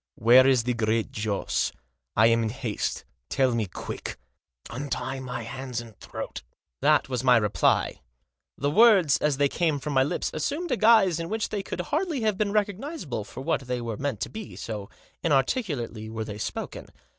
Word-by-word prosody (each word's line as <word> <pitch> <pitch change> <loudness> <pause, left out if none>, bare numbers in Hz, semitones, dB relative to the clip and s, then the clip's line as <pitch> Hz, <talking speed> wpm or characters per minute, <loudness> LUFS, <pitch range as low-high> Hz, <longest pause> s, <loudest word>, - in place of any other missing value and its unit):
" - - -65
Where 130 +2 +8
is 130 -3 +4
the 125 +1 0
Great 115 -1 0
Joss? 105 -2 -1 0.4
I 110 - +6
am 115 0 +4
in 110 - 0
haste. 120 -2 -3 0.2
Tell 130 -2 +2
me 115 -3 0
quick." 90 - -6 0.3
" - - -19
Untie 135 0 -3
my 125 -2 -5
hands 125 +1 -5
and 115 -2 -10
throat." - - -6 0.4
That - - +4
was 125 -2 -2
my 125 -2 +6
reply. 105 -2 +1 0.6
The 145 +2 0
words, 195 -6 +6
as 150 -3 +1
they 145 0 +4
came 160 0 0
from 145 +1 -4
my 130 - +4
lips, 135 - -1
assumed 290 - -2
a - - +3
guise 215 -7 +5
in 165 - -4
which 220 0 -1
they 205 - -2
could 195 - -4
hardly 310 -2 -1
have 215 -2 +1
been 200 +1 0
recognisable 205 - -2
for 105 +6 -9
what 135 - 0
they 125 -1 -1
were 115 -2 -4
meant 135 -4 -3
to - - -2
be, 220 -2 -8
so 105 -3 -6 0.3
inarticulately 135 - 0
were 110 0 -4
they 105 -2 -7
spoken. - - -5
130 Hz, 190 wpm, -26 LUFS, 115-190 Hz, 0.6 s, Where